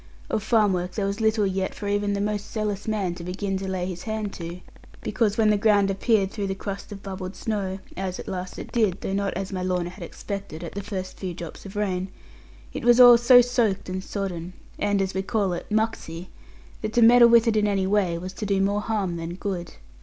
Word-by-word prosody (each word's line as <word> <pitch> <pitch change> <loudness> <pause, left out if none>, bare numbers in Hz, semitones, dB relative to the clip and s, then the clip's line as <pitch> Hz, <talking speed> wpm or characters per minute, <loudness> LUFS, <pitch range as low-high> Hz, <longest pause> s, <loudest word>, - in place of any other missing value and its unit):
Of - - 0
farm 215 -2 +3
work 180 0 -2
there 205 - -1
was 200 +3 -2
little 220 -1 +3
yet 190 0 -1
for 205 - -5
even 205 0 0
the 200 - -1
most 210 0 -2
zealous 210 -2 -3
man 205 -5 0
to 175 - -8
begin 195 +2 -3
to 195 - -5
lay 185 -1 -2
his 180 -1 -5
hand 220 -2 -3
to; 170 +1 -7 0.4
because 215 -3 0
when 215 -2 +4
the 210 - +2
ground 200 -2 +4
appeared 200 0 +1
through 205 -3 -3
the 190 - -2
crust 200 +1 -6
of 200 -1 -8
bubbled 190 -1 -6
snow 200 -4 -2 0.2
(as 185 -1 -4
at - - -8
last 185 0 -5
it - - -8
did, 210 -6 +1
though 195 - -3
not 200 0 0
as 195 +1 -4
my 185 - -2
Lorna 180 -1 -1
had 185 0 -10
expected, 175 -2 -6
at 170 - -6
the 200 - -5
first 190 -3 -6
few 180 -3 -4
drops 170 +3 -8
of 195 - -11
rain) 190 -3 -1 0.7
it - - -5
was 240 +1 +5
all 245 -1 +10
so 245 +1 +7
soaked 235 -6 0
and 185 0 -3
sodden, 180 -4 -4 0.3
and 205 -1 +1
as 190 - -3
we 190 - -1
call 195 -1 0
it, 175 - -5
'mucksy,' 210 -6 -2 0.5
that 215 0 -3
to 240 - +4
meddle 235 +1 +8
with 235 0 +6
it 225 - +3
in 210 -1 +3
any 195 -2 +1
way 190 -4 +1
was 185 +2 -6
to 210 - -5
do 195 -1 +1
more 200 +2 +1
harm 205 -6 -1
than 165 +1 -5
good. 185 -3 -4
195 Hz, 235 wpm, -25 LUFS, 185-215 Hz, 0.7 s, all